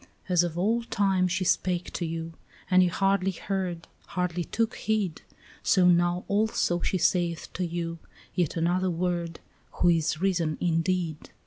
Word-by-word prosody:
"As 180 -2 +3
of 170 -1 -3
old 230 +6 0
time 190 -2 +2
she 185 +1 -1
spake 180 0 0
to 170 - -2
you, 165 0 -5 0.4
and 185 0 +7
you 180 - +4
hardly 195 +1 +1
heard, 185 -2 -3 0.2
Hardly 180 -1 -2
took 230 +6 -1
heed, 210 -7 -1 0.4
So 185 -2 +4
now 175 0 +3
also 200 -4 +1
she 190 - 0
saith 175 -2 0
to 185 - -2
you, 165 0 -4 0.3
yet 175 -3 0
another 180 +3 +1
word, 170 -1 -2 0.3
Who 175 - +3
is 160 -2 +1
risen 170 -5 0
indeed. 165 -1 -1
180 Hz, 150 wpm, -27 LUFS, 170-185 Hz, 0.4 s, and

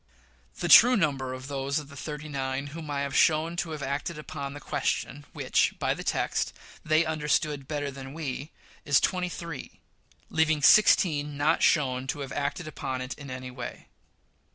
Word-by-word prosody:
The - - 0
true 245 +2 +9
number 135 -7 0
of 130 +1 -7
those 140 0 -2
of 150 -2 -5
the 140 - -12
"thirty 150 +1 -6
nine" 135 -1 -3
whom 160 -2 -7
I 140 -1 -1
have 140 -1 -3
shown 160 +2 +3
to 170 - -2
have 155 -3 -5
acted 145 +4 -3
upon 140 -2 -6
the - - -7
question 145 0 -2
which, - - +1
by - - 0
the - - -7
text, - - -1 0.3
they 155 +1 +3
understood 150 -2 0
better 145 -1 -3
than 135 +1 -9
we, 145 -2 -4 0.3
is 140 -2 +4
twenty 180 -1 0
three, 170 -5 -8 0.5
leaving 160 -2 +2
sixteen 150 -6 +5
not 145 +2 +2
shown 130 -4 +2
to 145 +2 -3
have 135 -1 -6
acted 145 +4 -3
upon 130 -4 -4
it 130 +1 -4
in 140 -2 -10
any 130 0 -6
way. 125 -1 -8
145 Hz, 175 wpm, -27 LUFS, 135-155 Hz, 0.5 s, true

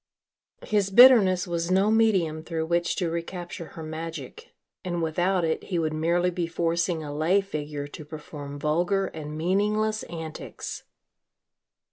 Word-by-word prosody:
His 205 -2 +1
bitterness 205 -5 +7
was 170 -1 -2
no 190 +3 +3
medium 190 -9 +2
through 160 0 -3
which 170 +1 0
to 175 -4 -1
recapture 170 0 -5
her 160 - -6
magic 165 - -7 0.3
and 175 -2 -2
without 175 +3 +1
it 160 - -2
he 180 - -2
would 160 -2 0
merely 170 +3 +1
be 175 -1 -2
forcing 170 0 -1
a 145 -1 -6
lay 165 +6 +3
figure 150 -6 -5
to 145 +1 -9
perform 150 -1 -8
vulgar 175 +7 +1
and 155 -3 -7
meaningless 210 +5 +1
antics. 160 -2 -7
170 Hz, 140 wpm, -26 LUFS, 160-190 Hz, 0.3 s, bitterness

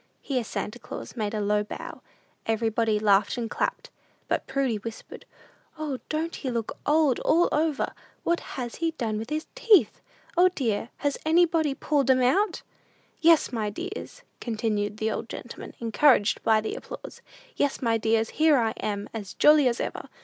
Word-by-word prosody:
(Here 255 -4 -1
Santa 225 +1 -5
Claus - - -8
made 215 -2 -2
a - - -1
low 210 0 +1
bow. 210 - -8 0.5
Everybody 225 -1 +1
laughed 205 +1 +3
and 235 -2 -2
clapped; - - -2 0.4
but - - -1
Prudy 265 -4 0
whispered, 225 +2 -9 0.5
"O, 295 -4 -3
don't 320 +2 -2
he 265 - -4
look 230 -3 -3
old 300 -4 +3
all 340 +2 +3
over? 305 -1 0 0.3
What 340 0 +1 0.2
has 245 -2 -4
he 330 0 0
done 220 -3 -1
with 225 +3 -6
his 310 +1 -2
teeth? 455 -6 +4 0.3
O, 360 +2 +6
dear, 235 - -2
has 285 -1 -1
anybody 320 -3 +3
pulled 280 -1 0
'em 255 -1 +5
out?") 355 +10 +2 0.6
"Yes, 330 -1 +5
my 215 -3 -1
dears," 385 - -7 0.2
continued 215 -3 -2
the 220 0 -1
old 225 - -4
gentleman, 240 - -8
encouraged 230 -1 +3
by 220 -1 +3
the 220 - -4
applause, - - -9 0.3
"yes, 285 -1 0
my 230 -2 +1
dears, 225 0 +1
here 310 -2 +4
I 225 -3 +2
am, 205 -1 -3
as 210 -4 -6
jolly 300 -2 +6
as 235 -1 0
ever! - - -4
245 Hz, 165 wpm, -26 LUFS, 220-310 Hz, 0.6 s, O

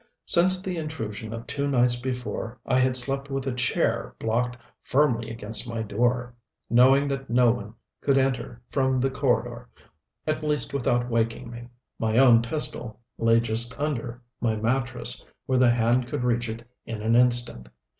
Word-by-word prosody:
Since 185 +2 +5
the 185 -2 -3
intrusion 115 -9 -5
of 115 0 -6
two 140 0 -2
nights 125 -3 +4
before 125 -2 -4
I 130 - +2
had 130 0 +2
slept 135 +2 -1
with 135 -1 -3
a 135 - -1
chair 125 0 0
blocked 120 +2 -1 0.2
firmly 125 -5 +1
against 115 +1 -3
my 115 -1 -3
door, 120 +3 0 0.4
knowing 130 +4 +5
that 135 -1 -4
no 120 0 +4
one 110 -1 -6 0.3
could 140 -1 +2
enter 130 -3 -1
from 130 -2 +1
the 135 +1 +1
corridor, 120 -3 -1 0.6
at 155 0 -1
least 150 -2 -1
without 120 -2 0
waking 115 +1 -1
me. 120 0 -9 0.3
My 110 0 0
own 125 -3 +7
pistol 115 -3 -3 0.2
lay 115 0 +4
just 115 +2 -1
under 125 -5 -3 0.2
my 115 -2 0
mattress 120 +2 -1 0.2
where 130 -1 +1
the 125 -1 +5
hand 120 +1 +2
could 125 - -3
reach 120 -1 0
it 115 +2 -7 0.2
in 110 -2 -6
an 115 +1 +2
instant. 120 - +2
120 Hz, 165 wpm, -25 LUFS, 115-130 Hz, 0.6 s, own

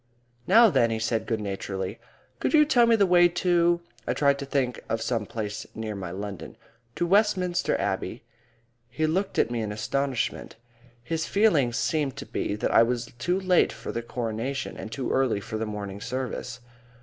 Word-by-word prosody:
"Now 225 +3 +7
then," 125 -6 +3
he 115 - -1
said 110 0 -1
good 115 -2 -1
naturedly. 95 -2 -4 0.4
"Could - - +1
you 300 -1 +7
tell 245 -6 +4
me 230 - +5
the 205 -3 +4
way 175 -1 +6
to" 175 -1 +2 0.3
I - - 0
tried 140 -1 +3
to 140 - -5
think 130 -3 -1
of 115 - 0
some 115 -2 -2
place 105 -2 -5
near 110 -1 -4
my 95 -3 -5
London 100 +1 -7 0.4
"to 175 - 0
Westminster 185 -2 +2
Abbey?" - - -2 0.7
He 155 +6 -1
looked 190 +5 -1
at - - +2
me 120 -1 -1
in 105 -1 -3
astonishment. 130 +4 -2 0.5
His 160 +6 -2
feeling 170 - +3
seemed 140 +2 -1
to - - -6
be 100 - -2
that 105 - -1
I - - +7
was 120 0 -1
too 180 +7 0
late 185 -2 +3
for - - -7
the 115 - -3
Coronation 120 +3 -4
and 110 - -8
too 130 +1 -3
early 130 -6 +2
for 110 +2 -5
the 110 - -2
morning 100 -1 -6
service. 125 0 -4
125 Hz, 185 wpm, -26 LUFS, 110-175 Hz, 0.7 s, Now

